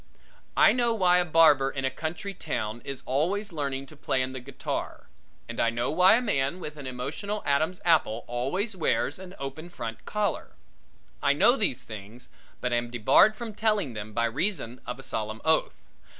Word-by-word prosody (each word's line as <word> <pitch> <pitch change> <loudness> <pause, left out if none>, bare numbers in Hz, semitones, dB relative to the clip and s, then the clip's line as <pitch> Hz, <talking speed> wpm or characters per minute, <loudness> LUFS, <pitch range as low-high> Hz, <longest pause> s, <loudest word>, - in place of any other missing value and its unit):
I - - +7
know 240 -2 +1
why 180 -3 +4
a 180 - +2
barber 155 -5 +5
in 135 -1 -3
a 130 - 0
country 165 +8 -4
town 115 - -4
is 140 -1 -6
always 180 +9 -1
learning 140 -3 -3
to 155 - -15
play 135 -2 0
on 130 0 -4
the 130 - -5
guitar 135 +3 -5 0.4
and - - -6
I 115 - +3
know 120 +1 -1
why 185 +5 +6
a 240 - +2
man 140 - 0
with 150 -4 -6
an 145 -3 -7
emotional 145 +12 -4
Adam's 155 +6 +1
apple 150 -9 +3
always 140 - -2
wears 175 - 0
an 190 0 -10
open 140 +5 -6
front 115 -9 -6
collar. 210 -1 -2 0.7
I - - +4
know 245 - +5
these 205 - 0
things, 110 +2 -10 0.3
but 125 -1 -1
am 120 0 0
debarred 120 - +5
from 230 -2 -6
telling 210 - 0
them 105 0 -6
by 115 +2 +1
reason 125 - -2
of 125 - -4
a 135 - -11
solemn 110 -4 -3
oath. 160 0 +2
140 Hz, 185 wpm, -27 LUFS, 125-185 Hz, 0.7 s, I